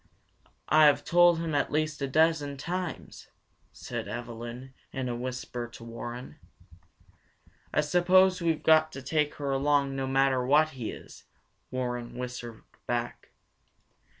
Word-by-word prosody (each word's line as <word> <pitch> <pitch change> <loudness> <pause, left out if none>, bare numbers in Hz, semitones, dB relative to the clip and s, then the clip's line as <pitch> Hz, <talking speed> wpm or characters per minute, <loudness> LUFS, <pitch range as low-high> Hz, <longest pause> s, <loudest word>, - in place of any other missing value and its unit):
"I 155 +1 +6
have 145 - +3
told 175 0 +5
him 165 -1 -3
at 145 - 0
least 155 -1 -1
a 140 - 0
dozen 150 -1 +2
times," 180 +3 -5 0.4
said - - -6
Evelyn 120 +2 -7 0.2
in 130 -2 -3
a 120 - -2
whisper 125 -1 -5
to 120 0 -13
Warren. 120 +1 -7 1.3
"I - - +2
suppose 180 +4 +4
we 170 - +1
have 160 - -1
got 155 0 +5
to 135 - -8
take 150 +2 0
her 140 -2 -3
along, 140 0 +1
no 135 0 -2
matter 135 -1 +2
what 150 +4 +4
he 125 -7 -6
is," - - -11 0.4
Warren 125 -2 -4
whispered 125 -2 -7 0.2
back. - - -3
140 Hz, 140 wpm, -28 LUFS, 125-155 Hz, 1.3 s, I